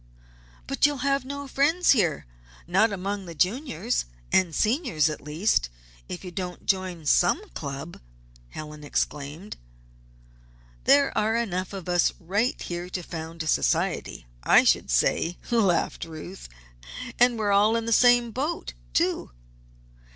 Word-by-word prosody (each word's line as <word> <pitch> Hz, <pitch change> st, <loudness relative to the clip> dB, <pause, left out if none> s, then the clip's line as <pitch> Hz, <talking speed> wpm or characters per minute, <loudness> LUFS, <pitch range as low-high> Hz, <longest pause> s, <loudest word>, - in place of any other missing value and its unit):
"But 290 Hz, -, +3 dB
you'll 280 Hz, -3 st, -3 dB
have 275 Hz, -1 st, +1 dB
no 280 Hz, +1 st, -6 dB
friends 315 Hz, +7 st, +3 dB
here 175 Hz, -, +2 dB, 0.4 s
not 195 Hz, +6 st, +3 dB
among 195 Hz, 0 st, -4 dB
the 170 Hz, -, -8 dB
Juniors 195 Hz, -, 0 dB, 0.3 s
and 175 Hz, -4 st, +2 dB
Seniors, 220 Hz, -, +1 dB
at 150 Hz, -, -7 dB
least 150 Hz, -, 0 dB, 0.4 s
if 180 Hz, -, -6 dB
you 180 Hz, -, -6 dB
don't 180 Hz, 0 st, -6 dB
join 185 Hz, -4 st, -1 dB
some 240 Hz, -, +3 dB
club!" 140 Hz, +3 st, -7 dB, 0.5 s
Helen 150 Hz, -, -9 dB
exclaimed. 145 Hz, +6 st, -3 dB, 1.3 s
"There 280 Hz, -1 st, +4 dB
are 220 Hz, +1 st, +1 dB
enough 190 Hz, -6 st, -2 dB
of 195 Hz, -3 st, -7 dB
us 175 Hz, -1 st, +2 dB
right 200 Hz, +8 st, 0 dB
here 175 Hz, +1 st, -5 dB
to 180 Hz, -1 st, -4 dB
found 165 Hz, -1 st, -6 dB
a -, -, -7 dB
society, -, -, 0 dB, 0.2 s
I -, -, +6 dB
should -, -, +2 dB
say," 160 Hz, -, +1 dB
laughed 195 Hz, -8 st, +1 dB
Ruth. 165 Hz, -, -9 dB, 0.7 s
"And 245 Hz, -1 st, +5 dB
we're 210 Hz, -2 st, 0 dB
all 210 Hz, +3 st, +4 dB
in 230 Hz, -1 st, -1 dB
the 230 Hz, -, +1 dB
same 245 Hz, 0 st, +5 dB
boat, 295 Hz, +9 st, -3 dB, 0.2 s
too." -, -, +1 dB
190 Hz, 135 wpm, -26 LUFS, 165-235 Hz, 1.3 s, I